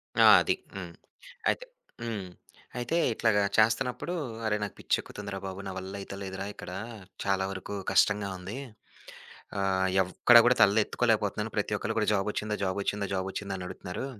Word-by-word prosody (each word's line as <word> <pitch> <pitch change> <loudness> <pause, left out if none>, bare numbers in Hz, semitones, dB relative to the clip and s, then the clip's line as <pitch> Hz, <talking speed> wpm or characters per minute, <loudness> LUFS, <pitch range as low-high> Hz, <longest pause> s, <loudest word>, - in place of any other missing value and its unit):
ఆ! - - +6 0.2
అది, - - +1 0.2
హ్మ్. - - -6 0.6
అయితే - - -1 0.4
హ్మ్. 110 -5 -3 0.5
అయితే 120 +6 -1 0.2
ఇట్లాగా 110 -3 +2
చేస్తున్నప్పుడు, 125 +9 +2 0.3
"అరె! 105 -1 +2
నాకు 100 - -5
పిచ్చెక్కుతుందిరా 100 -2 -2
బాబు, 95 0 -5
నా - - -4
వల్ల 95 0 -6
అయితలేదురా 95 0 -6
ఇక్కడ, - - -9 0.5
చాలా 95 -1 +1
వరకు 100 +1 -6 0.2
కష్టంగా 105 -1 +3
ఉంది. 95 +7 -7 1.0
ఆహ్, 95 -1 +2
ఎవ్ 90 0 -2
ఎక్కడా 120 -1 +9
కూడా 125 +1 +5
తలలెత్తుకోలేకపోతున్నాను 105 +1 +2
ప్రతి - - 0
ఒక్కలు - - -3
కూడా - - +1
"జాబ్ 100 0 +1
ఒచ్చిందా 105 0 -2
జాబ్ 95 +1 -1
ఒచ్చిందా? 100 0 -1
జాబ్ 95 0 -1
ఒచ్చిందా?" 100 -1 -4
అని 90 - -6
అడుగుతున్నారు. 90 +8 -6
100 Hz, 150 wpm, -29 LUFS, 95-110 Hz, 1.0 s, ఎక్కడా